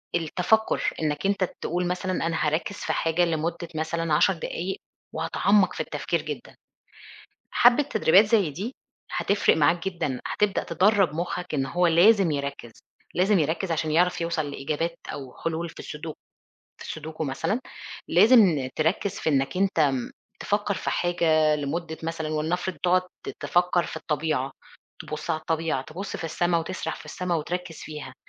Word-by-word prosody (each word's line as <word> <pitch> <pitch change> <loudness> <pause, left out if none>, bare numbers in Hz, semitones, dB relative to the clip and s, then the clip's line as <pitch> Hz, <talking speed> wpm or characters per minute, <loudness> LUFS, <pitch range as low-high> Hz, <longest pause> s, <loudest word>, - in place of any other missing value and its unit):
التَفَكُّر، 180 +6 +1
إنّك 150 +3 -1
أنت 200 -1 +2 0.2
تقول 175 +1 -1
مثلًا 180 +1 -2 0.2
أنا 160 -2 0
هاركِّز 160 +7 -1
في - - -2
حاجة 165 +2 +2
لمدة 170 +1 -2
مثلًا 160 0 -1
10 190 +5 +4
دقايق 180 +2 -4 0.3
وهاتعمَّق 185 +4 +2
في - - -8
التفكير - - -2
جدًا. - - -7 1.0
حبّة 245 +4 +5
تدريبات 215 - +5
زي 205 -7 +2
دي 205 - -5 0.4
هتفرق 200 -4 +2
معاك 165 +4 +2
جدًا، 145 -8 -3
هتبدأ 210 -2 0
تدرَّب 195 -1 +3
مُخّك 175 +1 -3
إن 135 -3 +1
هو 175 +6 +2
لازم 180 +1 +5
يركِّز، 140 -4 -4 0.4
لازم 190 +2 +3
يركِّز 160 +4 -1
عشان 160 -1 0
يعرف 175 +2 +2
يوصل 165 -3 -1
لإجابات 160 +5 -3 0.2
أو 135 -3 -8
حلول 165 +1 -2
في - - -14
السودوك 150 +1 -7 0.6
في - - -9
السودوكو 155 0 -5
مثلًا 165 - -1 0.5
لازم 195 - +5
تركِّز 180 +5 0
في - - -1
إنّك 135 +5 +1
أنت 190 -3 +1
م 135 -4 +1 0.3
تفكّر 205 0 0
في - - -3
حاجة 160 -3 +2
لمدة 160 +3 -3
مثلًا 160 -1 -3
ولنفرض 165 +4 -1
تقعُد 180 +1 +4 0.2
ت - - -2
تفكّر 175 0 +2
في - - -6
الطبيعة، 150 -3 -1 0.5
تبُص - - -5
على 155 - 0
الطبيعة، 160 -4 -1
تبُص 180 +8 -6
في - - -7
السما 170 +1 +1
وتسرح 165 -1 -4
في - - -12
السما 175 +3 -3
وتركِّز 175 +1 -3
فيها. 150 -4 -8
165 Hz, 155 wpm, -26 LUFS, 155-185 Hz, 1.0 s, حبّة